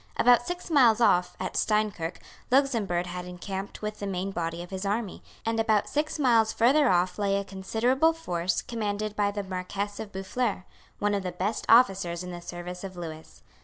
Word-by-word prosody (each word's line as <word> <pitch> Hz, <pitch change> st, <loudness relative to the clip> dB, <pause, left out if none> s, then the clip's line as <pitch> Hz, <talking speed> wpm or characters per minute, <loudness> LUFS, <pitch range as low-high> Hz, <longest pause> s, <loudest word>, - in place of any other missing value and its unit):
About 245 Hz, 0 st, +5 dB
six 355 Hz, 0 st, -5 dB
miles 240 Hz, -7 st, +5 dB
off, 180 Hz, -6 st, +3 dB
at 185 Hz, -, -4 dB
Steinkirk, 210 Hz, -6 st, 0 dB, 0.3 s
Luxemburg 230 Hz, -10 st, +2 dB
had 180 Hz, 0 st, -6 dB
encamped 190 Hz, +3 st, -6 dB
with 210 Hz, 0 st, -4 dB
the 200 Hz, -, -4 dB
main 190 Hz, 0 st, -2 dB
body 170 Hz, -1 st, -3 dB
of 175 Hz, -, -12 dB
his 190 Hz, 0 st, -4 dB
army; 205 Hz, 0 st, -2 dB, 0.2 s
and 225 Hz, 0 st, 0 dB
about 220 Hz, -2 st, +2 dB
six 300 Hz, +2 st, -1 dB
miles 230 Hz, -6 st, +4 dB
further 265 Hz, +4 st, +4 dB
off 180 Hz, +1 st, +1 dB
lay 200 Hz, -1 st, +2 dB
a 200 Hz, -, -1 dB
considerable 225 Hz, +10 st, +1 dB
force 180 Hz, -, -2 dB
commanded 215 Hz, -2 st, -3 dB
by 205 Hz, -1 st, +2 dB
the 205 Hz, 0 st, -3 dB
Marquess 195 Hz, +2 st, -4 dB
of 215 Hz, -2 st, -6 dB
Boufflers, 195 Hz, +1 st, -2 dB, 0.3 s
one 205 Hz, 0 st, 0 dB
of 200 Hz, -, 0 dB
the 185 Hz, -1 st, -4 dB
best 190 Hz, +5 st, -3 dB
officers 195 Hz, -7 st, +4 dB
in 180 Hz, -, -6 dB
the 175 Hz, 0 st, -7 dB
service 175 Hz, +1 st, -7 dB
of 190 Hz, -2 st, -7 dB
Lewis. 160 Hz, -2 st, -9 dB
200 Hz, 185 wpm, -27 LUFS, 180-225 Hz, 0.3 s, About